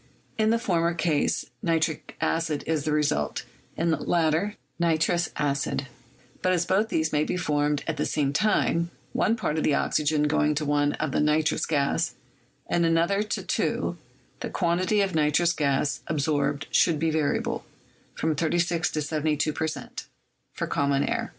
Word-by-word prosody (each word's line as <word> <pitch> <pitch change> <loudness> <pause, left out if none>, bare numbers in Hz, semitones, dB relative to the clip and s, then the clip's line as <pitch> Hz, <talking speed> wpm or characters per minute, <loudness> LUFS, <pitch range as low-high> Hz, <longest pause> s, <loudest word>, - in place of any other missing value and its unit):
In 220 0 +2
the 230 - +3
former 170 -6 0
case 155 -3 +1 0.2
nitric 165 -4 -1
acid 160 -3 0
is 155 -3 -1
the 155 - 0
result; 145 - 0 0.3
in 165 0 +1
the 160 - +2
latter 170 +5 +1 0.2
nitrous 170 +1 +2
acid: 140 -1 -1 0.6
but 185 - +2
as 175 -2 +1
both 205 +5 +1
these 160 -1 0
may 150 0 +3
be 180 - -2
formed 150 -3 0
at 165 -2 -3
the - - 0
same 140 -2 0
time, 170 -2 +2 0.2
one 225 - +2
part 155 -8 -1
of - - -1
the 145 - +3
oxygen 150 0 +1
going 150 0 +2
to 150 +1 -1
one 145 0 +2
of 155 -3 -3
nitrous 150 +1 +2
gas, 140 -3 0 0.5
and 170 - +1
another 170 +4 +2
to 210 - -3
two, - - -1 0.4
the - - -4
quantity 185 +4 +1
of 195 -1 0
nitrous 160 +2 +3
gas 140 -1 0
ab 155 - -1
sorbed 145 -1 0
should 165 -3 +4
be 160 +1 0
variable; 155 -2 0 0.5
from 160 0 0
36 170 +2 +1
to 155 - -3
y2 155 0 0
per 160 - -1
cent, 155 - -6 0.4
for - - -3
common 140 -1 +1
air." - - -1
155 Hz, 165 wpm, -26 LUFS, 150-170 Hz, 0.6 s, should